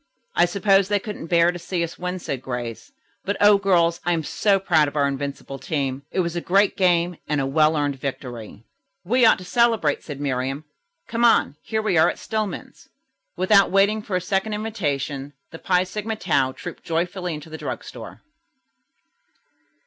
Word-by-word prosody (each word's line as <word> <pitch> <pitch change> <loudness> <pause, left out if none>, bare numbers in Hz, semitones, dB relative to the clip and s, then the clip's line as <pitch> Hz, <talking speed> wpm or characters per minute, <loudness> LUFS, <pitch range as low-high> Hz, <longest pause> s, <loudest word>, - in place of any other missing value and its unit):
"I - - +5
suppose 195 +1 +2
they 205 0 +2
couldn't 205 -4 -6
bear 170 0 +4
to 175 - -8
see 175 0 -2
us 170 - -6
win," 180 +1 -3
said 140 -7 -5
Grace. 125 - -6 0.3
"But, 200 +1 -2
O 205 -1 +6
girls, 170 -3 +2
I 175 - +1
am 165 -2 -1
so 200 +5 +1
proud 160 -6 +3
of 145 - -7
our 140 -1 +2
invincible 140 0 -5
team. 135 -3 -2
It 185 - 0
was 170 -1 -3
a 175 - -2
great 195 +4 +2
game 175 -2 +2
and 150 -1 0
a 135 - 0
well 155 +3 +3
earned 145 -2 -1
victory." 120 -6 -6 0.4
"We 240 +4 +4
ought - - +5
to 185 - -10
celebrate," 225 -7 +2
said 145 -3 -7
Miriam. 135 +1 -2 0.4
"Come 230 0 -1
on. 230 -10 +4
Here 220 -1 -2
we 190 -6 +2
are - - +5
at - - -4
Stillman's." 215 -2 -5 0.5
Without 200 +1 +4
waiting 200 +3 +3
for 205 -3 -4
a 180 - +1
second 195 +3 -1
invitation, 145 - -3 0.2
the 165 - -9
Phi 180 -1 +2
Sigma 210 +4 -4
Tau 140 -10 +1
trooped 175 +5 -9
joyfully 175 +1 -2
into 150 +1 -10
the 160 - -6
drug - - -5
store. - - -10
175 Hz, 185 wpm, -23 LUFS, 145-200 Hz, 0.5 s, O